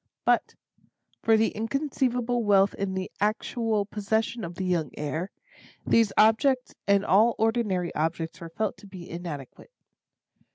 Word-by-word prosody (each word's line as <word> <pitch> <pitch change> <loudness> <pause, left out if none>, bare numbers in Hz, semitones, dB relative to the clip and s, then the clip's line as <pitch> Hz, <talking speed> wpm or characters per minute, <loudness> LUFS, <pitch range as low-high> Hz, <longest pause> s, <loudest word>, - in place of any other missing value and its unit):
But, - - +2 0.7
for 225 -1 +4
the 220 0 +3
inconceivable 245 0 -1
wealth 200 -2 +4
in 195 -1 -3
the 185 0 -4
actual 215 0 0
possession 220 +3 -2
of 170 0 -6
the 190 - -4
young 170 -5 0
heir, 155 +5 -3 0.6
these 225 -3 +3
objects 250 +4 +3
and 200 0 +3
all 220 +5 +4
ordinary 215 -6 0
objects 160 +1 -2
were 165 - -7
felt 215 +6 -2
to 205 - -14
be 185 -3 -10
inadequate. 165 -6 -8
205 Hz, 135 wpm, -27 LUFS, 180-225 Hz, 0.7 s, for